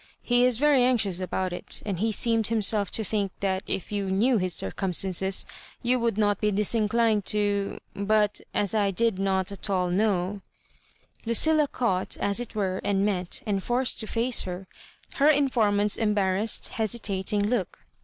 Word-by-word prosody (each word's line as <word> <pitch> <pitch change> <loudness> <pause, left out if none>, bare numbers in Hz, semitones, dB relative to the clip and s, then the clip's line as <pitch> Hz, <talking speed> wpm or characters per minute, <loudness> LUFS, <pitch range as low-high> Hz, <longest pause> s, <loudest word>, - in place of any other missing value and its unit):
He 245 0 +3
is 250 -3 +2
v^y 295 -1 +4
anxious 225 -8 +2
about 185 0 -2
it, - - -6
and 195 -5 -3
he 220 +2 +1
seemed 225 0 +2
himself 215 -2 +1
to 220 - -2
think 200 -2 -1
that 190 -1 0
if 190 - -3
you 200 -2 -2
knew 220 +5 +2
his 185 -2 -2
circumstances 190 - 0 0.4
you 250 +1 +2
would 230 -3 -1
not 205 -1 +1
be 210 - +2
disinclined 215 +1 +1
to— 205 -1 0
» - - -40
But 210 +1 +1
as 205 -1 0
I 205 -2 +2
did 215 0 0
not 190 -1 0
at 200 +1 -5
all 180 -2 0
know—" 195 0 0 0.9
Ludlla 300 +5 +3
caught, 190 -7 -1
as 200 +2 0
it 240 -2 -7
were, 190 -3 -1
and 200 0 +1
met^^nd 195 +2 -2
forced 245 +5 0
to 220 - -2
&ce 235 +3 0
her, 180 +1 -6 0.5
her 285 - +4
informant's 225 -9 +2
embarrassed, 210 -1 0
hesitatmg 215 -4 -1 0.2
kx>k. 245 - 0
210 Hz, 165 wpm, -26 LUFS, 195-230 Hz, 0.9 s, v^y